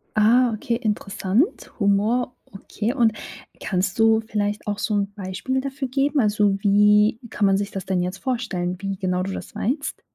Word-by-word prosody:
Ah, 235 +3 +4
okay, 235 +2 -2
interessant, 210 - -1
Humor, 215 +5 +1 0.2
okay. 210 +4 -3
Und 235 -5 +3 0.5
kannst 190 +2 -1
du 225 0 +5
vielleicht 210 -1 -2
auch 205 0 -2
so 210 - -1
'n 200 0 -1
Beispiel 205 +7 -3
dafür 275 0 -4
geben? 280 +2 +1
Also, 205 -3 +2
wie 210 +2 +4
kann 210 - 0
man 195 0 +4
sich 200 0 -3
das 190 -2 -5
denn 185 -2 0
jetzt 180 +2 -3
vorstellen, 190 -8 -2
wie 195 -1 -3
genau 185 -1 -1
du 195 - -4
das - - -8
meinst? 275 +6 -2
210 Hz, 170 wpm, -23 LUFS, 195-235 Hz, 0.5 s, du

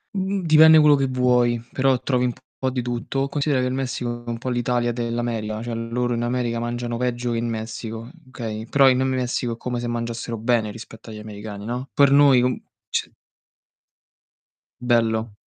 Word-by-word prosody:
Mhmm, 195 0 -1
dipende 160 0 +8
quello 150 -1 +6
che 135 -1 0
vuoi, 125 -2 +2
però 135 -1 +2
trovi 125 -1 0
un 125 - 0 0.3
po' 130 - 0
di 125 -1 -3
tutto. 125 +3 -2
Considera 140 -2 0
che - - 0
il 125 - -2
Messico 125 -2 -3
è 120 - -8
un 115 - -3
po' 130 +2 -5
l'Italia 120 0 0
dell'America, 115 -2 -3
cioè 120 0 -4
loro 115 +2 -2
in 120 - -1
America 120 -1 -1
mangiano 120 0 -3
peggio 120 0 -2
che 115 - -1
in 120 - -2
Messico, 110 +1 -6 0.2
okay, 110 -3 -6
però 135 +1 +5
in 130 0 +2
Messico 125 -2 -1
è - - -8
come 125 0 -3
se 120 - -3
mangiassero 115 0 -4
bene 115 -1 +1
rispetto 110 +1 -11
agli 110 - -8
americani, 105 -1 -8
no, 125 +4 -4
per 140 -1 +5
noi 140 -3 +6
non 125 +1 0 0.3
c - - -1 1.7
Bello. 115 -2 +1
120 Hz, 180 wpm, -23 LUFS, 115-130 Hz, 1.7 s, dipende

